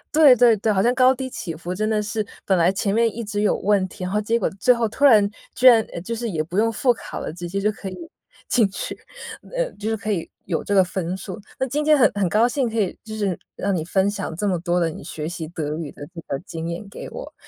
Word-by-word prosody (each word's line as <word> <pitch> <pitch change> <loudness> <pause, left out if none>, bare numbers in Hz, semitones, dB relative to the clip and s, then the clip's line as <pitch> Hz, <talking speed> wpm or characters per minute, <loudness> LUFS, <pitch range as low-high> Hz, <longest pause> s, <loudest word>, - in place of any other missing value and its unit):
对 305 -4 +8
对 240 -1 +5
对， 215 +2 +1
好 195 -2 +2
像 240 +4 +2
高 255 0 +5
低 265 0 -5
起 175 -8 -5
伏 175 +3 -5
真 215 +3 -1
的 215 -1 +1
是， 210 +1 -2 0.2
本 190 - +3
来 170 +1 +4
前 195 +1 -1
面 230 -1 +2
一 235 - -5
直 205 -2 -3
有 210 - +3
问 200 -1 +2
题， 185 -1 -7
然 180 - -4
后 210 - +2
结 230 +2 +1
果 - - 0
最 225 +6 +3
后 235 -2 0
突 245 +6 -5
然 215 -7 +7 0.2
居 255 - +4
然 235 -3 +8
呃， - - -5
就 230 +7 -4
是 235 0 -3
也 165 -6 -1
不 170 +4 -5
用 225 +2 +3
复 245 +3 +2
考 225 - -8
了， - - -5
直 175 0 -6
接 195 - -2
就 205 +2 +2
可 195 - -7
以 - - -8 0.5
进 235 -3 +4
去， - - -5 0.6
呃， - - +1
就 210 +1 -4
是 225 - 0
可 215 +1 -6
以 170 -4 -3 0.2
有 170 -4 -2
这 205 - -2
个 195 - +6
分 180 0 -3
数。 190 -1 -7 0.2
那 265 - 0
今 290 +4 -1
天 305 0 +5
很 260 - +5
很 200 -3 0
高 220 +6 +4
兴 250 -1 0
可 225 0 -2
以 195 -4 -1
就 220 - -8
是 205 -5 -1 0.2
让 200 0 0
你 165 - -1
分 190 +4 +1
享 200 -5 -4
这 205 - -1
么 185 -3 +1
多 175 +1 0
的 170 -2 +1
你 155 - -9
学 155 0 -5
习 165 -2 -5
德 155 -3 -3
语 160 -3 -5
的 145 - -10
这 165 - -6
个 135 - -2
经 165 0 -5
验 175 +4 -5
给 - - -8
我， - - -8
205 Hz, 300 characters per minute, -22 LUFS, 180-230 Hz, 0.6 s, 对